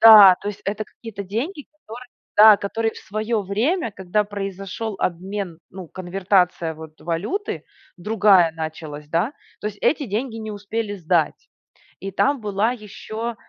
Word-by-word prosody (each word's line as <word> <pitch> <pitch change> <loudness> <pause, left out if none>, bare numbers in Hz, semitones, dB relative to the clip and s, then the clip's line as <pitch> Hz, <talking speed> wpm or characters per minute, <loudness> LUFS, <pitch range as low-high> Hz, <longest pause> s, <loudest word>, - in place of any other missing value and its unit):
Да, 210 -5 +10
то 205 - -4
есть, 205 - -6
это 210 +2 -2
какие-то 210 -2 -8
деньги, 260 - -4
которые, 245 -3 -11 0.3
да, 215 0 +10
которые 225 +3 -1
в - - -11
свое 215 +2 -2
время, 230 - 0
когда 195 +2 0
произошел 195 +1 -5
обмен, 185 0 -3
ну, 185 -3 -9
конвертация 180 -2 +1
вот 160 0 -12
валюты, 195 - -3 0.3
другая 195 -3 +4
началась, 155 -2 -6
да, 170 - +1 0.3
то - - -4
есть, 205 -1 -5
эти 295 -4 +2
деньги 225 +3 -2
не 220 -1 -5
успели 210 +1 -3
сдать. 170 -4 0 0.5
И 195 +1 -5
там 275 +6 +1
была 210 +2 +1
еще, 220 +1 -6
205 Hz, 145 wpm, -22 LUFS, 180-225 Hz, 0.5 s, Да